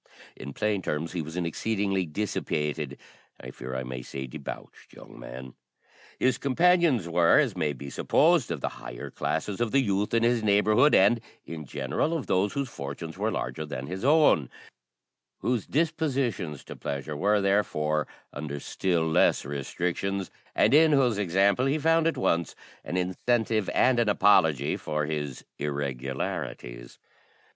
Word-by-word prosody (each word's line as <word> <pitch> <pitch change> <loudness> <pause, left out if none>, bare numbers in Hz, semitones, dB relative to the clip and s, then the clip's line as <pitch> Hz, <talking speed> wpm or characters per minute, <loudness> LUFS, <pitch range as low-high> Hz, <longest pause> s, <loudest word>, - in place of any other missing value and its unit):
In 70 +2 -8
plain 105 +2 0
terms, 80 -1 -3
he 90 - -2
was 80 +3 -7
an 90 - -1
exceedingly 95 +1 -1
dissipated 75 -5 -2 0.4
I 60 - -8
fear 65 +1 -7
I 65 - -2
may 65 0 -6
say 65 +2 -6
debauched, 70 +2 -9
young - - -13
man. 65 +2 -9 0.6
His 130 -1 +1
companions 160 - +3
were, 85 0 +4
as - - +2
may 75 - 0
be 70 +1 -9
supposed, 165 -4 +3
of 80 -5 -3
the - - -1
higher - - -7
classes 95 +7 -2
of 120 -2 0
the 135 - +4
youth 100 0 0
in 115 - +3
his 120 0 +3
neighbourhood, 110 +6 +4
and, 110 +5 +4 0.2
in 80 -2 -7
general, 70 - -1
of 140 - -5
those 100 +2 +1
whose 140 -1 -2
fortunes 70 - -7
were - - -1
larger 60 +5 -3
than 70 -3 -6
his 95 +5 -6
own, 145 - +4 0.9
whose 120 -3 -1
dispositions 135 - -1
to - - -9
pleasure 70 +2 -4
were, 105 +7 +2
therefore, 75 -7 +1 0.3
under 75 0 -5
still 85 +1 -1
less 80 - +3
restrictions, 90 +7 -3 0.2
and 110 - +4
in 155 +1 +6
whose 125 -7 +3
example 100 +6 +2
he 140 +3 +1
found 165 +1 +3
at 165 - 0
once 85 - 0 0.3
an 90 - -3
incentive 110 +4 0
and 125 -2 +3
an 115 -3 +2
apology 80 -9 +3
for 75 -1 -2
his 75 -3 -4
irregularities. 65 -3 -4
90 Hz, 155 wpm, -27 LUFS, 75-115 Hz, 0.9 s, in